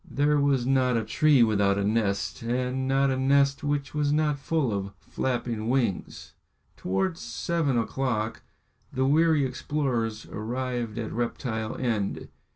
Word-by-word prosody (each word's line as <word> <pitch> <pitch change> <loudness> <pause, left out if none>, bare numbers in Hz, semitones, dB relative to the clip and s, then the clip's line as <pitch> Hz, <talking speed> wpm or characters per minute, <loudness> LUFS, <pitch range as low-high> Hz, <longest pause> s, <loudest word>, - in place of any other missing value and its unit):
There 145 +1 +2
was 140 -3 +2
not 130 -2 +2
a 115 - 0
tree 135 +4 +4
without 100 -3 +2
a 100 - 0
nest, 105 -1 0
and 125 +3 -1
not 135 0 +2
a 130 - 0
nest 140 +2 +3
which 145 -1 -2
was 150 -1 +1
not 150 -1 +1
full 135 -4 0
of 100 0 -3
flapping 120 -3 -3
wings. 120 -7 -1 0.4
Towards 165 - -1
seven 160 -7 -1
o'clock 115 -2 -1 0.5
the 130 +1 0
weary 155 0 +3
explorers 125 -6 -2
arrived 120 0 -4
at 115 -2 -3
Reptile 115 -1 -3
End. 110 -6 -2
130 Hz, 140 wpm, -27 LUFS, 115-140 Hz, 0.5 s, tree